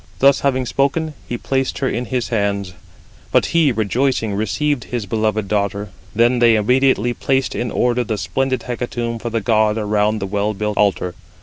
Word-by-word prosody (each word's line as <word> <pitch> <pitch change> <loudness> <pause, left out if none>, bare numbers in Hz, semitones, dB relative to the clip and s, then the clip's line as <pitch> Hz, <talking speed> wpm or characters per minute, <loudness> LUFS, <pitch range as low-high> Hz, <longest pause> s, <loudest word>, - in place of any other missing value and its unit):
Thus 140 0 +5
having 130 -2 0
spoken, 140 +5 0 0.2
he 120 - -2
placed 135 +2 -1
her 135 - 0
in 125 -1 -2
his 125 -2 -2
hands; 100 -4 -1 0.6
but - - +4
he 165 -4 +4
rejoicing 115 0 0
received 125 +7 -1
his 120 -4 -3
beloved 110 0 -1
daughter. 100 0 -1 0.3
Then 120 +2 +3
they 120 -1 +5
immediately 120 +1 +2
placed 135 +2 0
in 120 - -2
order 125 +1 +1
the 110 -2 -3
splendid 130 +4 -1
hecatomb 120 -1 -3
for 120 - -4
the 115 0 -1
god 110 -1 +2
around 105 0 +1
the 100 - -3
well 105 +2 -1
built 105 +1 -2
altar. 95 -3 +1
115 Hz, 175 wpm, -19 LUFS, 105-130 Hz, 0.6 s, Thus